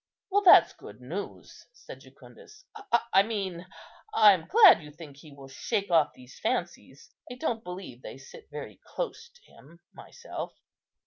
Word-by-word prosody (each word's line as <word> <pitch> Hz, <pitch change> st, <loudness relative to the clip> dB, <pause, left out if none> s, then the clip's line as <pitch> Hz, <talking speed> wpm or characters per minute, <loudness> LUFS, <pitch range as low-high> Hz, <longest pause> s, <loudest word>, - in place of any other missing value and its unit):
"Well, 405 Hz, +2 st, +3 dB
that's 380 Hz, -, +7 dB
good -, -, -14 dB
news," -, -, -9 dB
said 480 Hz, -, -13 dB
Jucundus; 420 Hz, -3 st, -17 dB, 0.5 s
"I 195 Hz, -, +7 dB
mean, 195 Hz, -5 st, -5 dB, 0.5 s
I 210 Hz, -2 st, +7 dB
am 170 Hz, -4 st, -5 dB
glad 415 Hz, -, +7 dB
you 150 Hz, -, -12 dB
think 150 Hz, -2 st, -13 dB
he 150 Hz, +1 st, -15 dB
will 140 Hz, -1 st, -13 dB
shake 185 Hz, +8 st, -3 dB
off 160 Hz, -3 st, +3 dB
these 125 Hz, 0 st, -16 dB
fancies. 135 Hz, +7 st, -4 dB, 0.2 s
I -, -, -7 dB
don't 230 Hz, -2 st, -3 dB
believe 180 Hz, -, -9 dB
they -, -, -10 dB
sit 135 Hz, -, -15 dB
very 145 Hz, -1 st, -9 dB
close 475 Hz, -1 st, -6 dB
to 485 Hz, 0 st, -25 dB
him 165 Hz, +5 st, -19 dB
myself." -, -, -9 dB
180 Hz, 155 wpm, -27 LUFS, 145-235 Hz, 0.5 s, that's